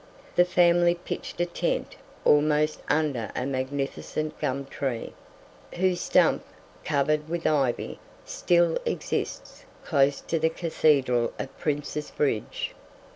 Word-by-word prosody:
The 175 - +6
family 175 -1 +4
pitched 175 -1 -6
a - - +3
tent 175 - -2 0.3
almost 150 +1 +3
under 145 -8 +1
a 125 - -1
magnificent 140 +3 -3
gum 135 +1 -1
tree, 135 -3 -4 0.6
whose 180 0 +1
stump, - - +3 0.4
covered 150 +1 +1
with 170 0 -3
ivy, 140 -5 0 0.3
still 175 -1 +2
exists - - -3 0.2
close 140 0 +3
to 165 - -1
the 160 +1 +3
Cathedral 140 -7 +2
at 135 - -6
Prince's 150 0 -2
Bridge. 125 -7 -1
150 Hz, 115 wpm, -26 LUFS, 135-170 Hz, 0.6 s, The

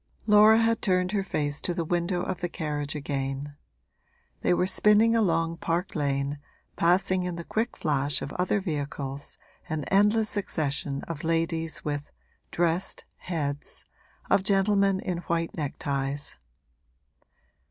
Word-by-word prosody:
Laura 215 +1 +7
had 230 0 +2
turned 185 -1 +1
her 205 -2 +1
face 145 -5 -2
to 175 - -2
the 170 - -1
window 175 +2 0
of 185 - -3
the 175 - -1
carriage 150 -3 -3
again; 140 0 -3 0.9
they - - +2
were 180 +1 +3
spinning 210 +4 +5
along 165 -6 +2
Park 170 +3 -2
Lane, 140 -1 -1 0.4
passing 185 +2 +2
in 180 -1 -3
the 170 - -6
quick 225 +7 -2
flash 145 -2 +1
of 140 - -6
other 185 +3 +1
vehicles 145 -5 -4 0.3
an 155 -2 -2
endless 210 +2 +3
succession 145 -7 -2
of 165 -3 -6
ladies 165 0 -1
with 145 -1 -3 0.4
'dressed' 175 +2 -1
heads, 145 -5 -4 0.4
of - - +4
gentlemen 195 0 +2
in 180 -2 -2
white 165 0 -1
neckties. 140 -1 -3
170 Hz, 130 wpm, -27 LUFS, 145-190 Hz, 0.9 s, Laura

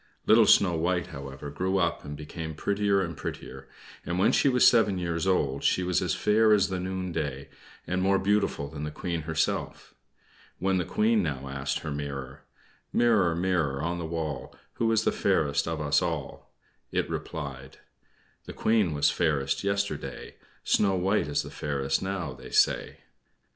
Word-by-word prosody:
Little - - +6
Snow 90 -3 +5
White, 85 +2 -1
however, 70 +1 -7
grew 95 +6 -1
up, 85 -3 0
and 75 0 -7
became 80 +1 -6
prettier 100 +3 +1
and 85 -2 -5
prettier, - - -7 0.3
and 85 +2 -3
when 95 - +4
she 140 - +3
was 125 -1 +4
seven 110 -5 +4
years 85 0 -2
old 70 -7 +1
she 90 - +2
was 90 -1 +1
as - - 0
fair 110 +1 +4
as 100 -1 +3
the 95 -1 -2
noonday, 85 -7 -4 0.4
and 95 +1 -1
more 95 +1 +3
beautiful 100 -7 0
than 75 +1 -7
the 75 - -3
Queen 85 +2 -4
herself. 80 -1 -2 0.6
When 95 0 +1
the 90 - -1
Queen 110 +3 +2
now 70 -6 -3
asked 70 0 -3
her 80 - -5
mirror: 70 -1 -6 0.5
"Mirror, 105 -8 +3
mirror 85 -6 0
on 85 +1 -2
the 85 - -4
wall, 80 -4 -4 0.2
Who 115 -1 +1
is 110 -1 +2
the - - +2
fairest 70 -1 +1
of 80 -1 -2
us 75 -2 +2
all?" - - -4 0.4
it - - 0
replied: 70 -3 -6 0.7
"The - - -8
Queen 105 -8 +1
was 75 0 +3
fairest 70 -2 0
yesterday; 100 0 -3 0.3
Snow 100 -2 +2
White 95 -1 +1
is 75 - 0
the - - -9
fairest, 70 -2 -1
now, 95 -3 -3
they - - -11
say." - - +1
85 Hz, 170 wpm, -27 LUFS, 75-95 Hz, 0.7 s, Little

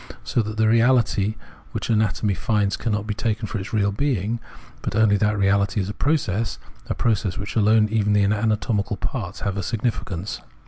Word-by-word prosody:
So 120 - +1
that 110 0 -5
the 110 - +3
reaUty 115 -2 +3 0.4
which - - -2
anatomy 110 -1 +1
finds 100 +2 0
cannot 105 -3 -2
be 105 - -2
taken 110 +1 -1
for 110 - -3
its 95 - -7
real 100 -2 +2
being, 115 -2 -1 0.4
but - - -3
only 110 -1 +4
that 105 +1 +1
reality 100 +2 +2
as 95 0 -1
a - - -3
process, 115 - 0 0.3
a - - -2
process 105 -5 0
in - - -6
which 100 - -6
alone 110 0 +4
even 105 -2 +2
the 105 -1 +4
ana 105 +2 +2
tomical 105 -2 -1
parts 105 -10 -4
have 100 -1 -2
a - - 0
significance. 105 -3 -3
105 Hz, 190 wpm, -23 LUFS, 100-115 Hz, 0.4 s, only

